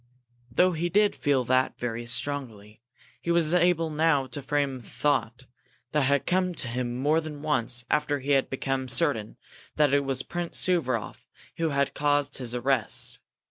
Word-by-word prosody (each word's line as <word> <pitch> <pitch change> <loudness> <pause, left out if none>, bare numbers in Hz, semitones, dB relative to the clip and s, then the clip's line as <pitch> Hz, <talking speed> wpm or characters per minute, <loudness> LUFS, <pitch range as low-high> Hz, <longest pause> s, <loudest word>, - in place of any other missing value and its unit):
Though 180 +10 +3
he 170 +1 -2
did 205 +3 +3
feel 140 -3 +1
that 130 +2 +1
very 120 -1 -4
strongly, 115 -5 -3 0.4
he - - -5
was 170 -1 +3
able 175 -2 +2
now 150 -3 +2
to 130 +2 -7
frame 140 -1 -1
a - - -13
thought 130 0 -1 0.5
that 150 - +2
had 140 +1 +1
come 180 -1 +1
to 130 - 0
him 120 0 -3
more 150 +5 +2
than 150 -2 -8
once 120 -4 -1
after 150 +1 +1
he 140 +1 -3
had 135 -1 +3
become 135 0 -2
certain 125 -7 0 0.4
that 150 -2 +3
it 140 0 +3
was 135 -1 -1
Prince 175 -1 -4
Suvaroff 170 -8 -1 0.3
who 165 -1 0
had 140 -1 0
caused 145 -1 +1
his 125 -2 -3
arrest. 125 -1 +1
140 Hz, 170 wpm, -27 LUFS, 125-155 Hz, 0.5 s, Though